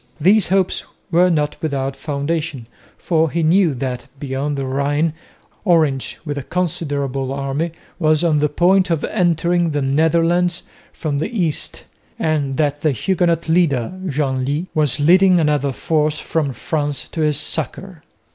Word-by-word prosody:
These 195 +5 +4
hopes 190 0 +1 0.3
were 180 +2 +4
not 150 -3 0
without 135 -3 -2
foundation, 145 -2 -3 0.3
for 165 -2 +1
he 165 +3 -1
knew 165 -2 +3
that, 125 -1 -4
beyond 140 +1 -2
the 135 - -2
Rhine, 145 +4 0 0.5
Orange 155 -8 +1
with 145 -2 -3
a - - -4
considerable 140 -5 -2
army 140 +4 -2 0.3
was 155 -1 +2
on 155 -3 +3
the 150 0 +2
point 180 +5 +3
of 165 -3 0
entering 175 -2 +1
the 145 -1 -1
Netherlands 165 +5 +2 0.3
from 145 -4 -3
the 155 - -2
east, 175 -10 -2 0.3
and 145 -4 -1
that 145 -2 0
the 155 -2 +2
Huguenot 170 - 0
leader, 160 -7 +2
Genlis, 140 +1 -1
was 150 -2 +1
leading 180 +4 +5
another 150 -3 +1
force 155 +2 0
from 155 -3 -1
France 145 +1 -3
to 160 - -4
his 150 -2 +2
succour. - - -4
155 Hz, 145 wpm, -19 LUFS, 140-170 Hz, 0.5 s, leading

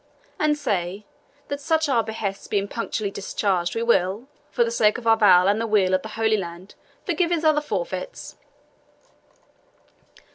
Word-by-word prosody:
And 300 -1 +2
say, 195 -5 -2 0.4
that 285 0 -4
such 320 +1 +1
our 240 -5 +2
behests 215 -3 -5
being 200 -1 -1
punctually 215 -2 -3
discharged 190 -3 -1
we 230 - -1
will, 205 +1 +1 0.2
for 240 - +2
the 230 - -2
sake 215 -1 +3
of 245 - -9
our 225 0 +5
vow 185 -5 +6
and 205 +3 +2
the 230 - -1
weal 200 -4 +2
of 185 - +2
the 220 - -7
Holy 220 -1 +2
Land, 175 0 -7 0.3
forgive 355 -2 0
his 340 -2 0
other 305 -1 +4
forfeits." - - -5
220 Hz, 160 wpm, -23 LUFS, 195-270 Hz, 0.4 s, vow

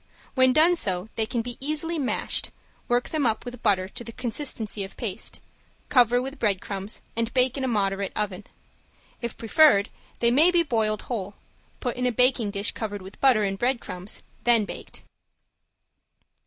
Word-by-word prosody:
When 260 -1 +5
done 320 +6 +5
so 185 - -1
they 220 -1 0
can 235 0 -1
be 245 0 -6
easily 310 +4 -1
mashed 270 - -1 0.4
work 245 0 +1
them 310 -2 -1
up 220 +2 -1
with 245 -1 -8
butter 190 -3 +2
to 240 +5 -7
the 230 - -8
consistency 230 -4 -2
of 195 - -9
paste, 215 -2 -4 0.5
cover 245 -2 +5
with 270 +3 -5
breadcrumbs, 200 -1 -2
and 230 0 0
bake 255 0 +3
in 270 - -3
a - - +1
moderate 200 -4 0
oven. 210 -2 -3 0.8
If 235 -2 -4
preferred 225 -3 +5 0.3
they 235 0 +3
may 300 +8 +6
be 350 -1 +3
boiled 220 -7 0
whole, 205 -4 -4 0.5
put 245 -2 -2
in 250 0 +1
a - - +2
baking 250 -2 +3
dish 200 +1 0
covered 205 -3 -5
with 190 +2 -12
butter 255 -6 +5
and 195 -1 -1
breadcrumbs, 235 -7 -3 0.2
then 235 -3 +4
baked. - - -9
235 Hz, 170 wpm, -25 LUFS, 205-255 Hz, 0.8 s, may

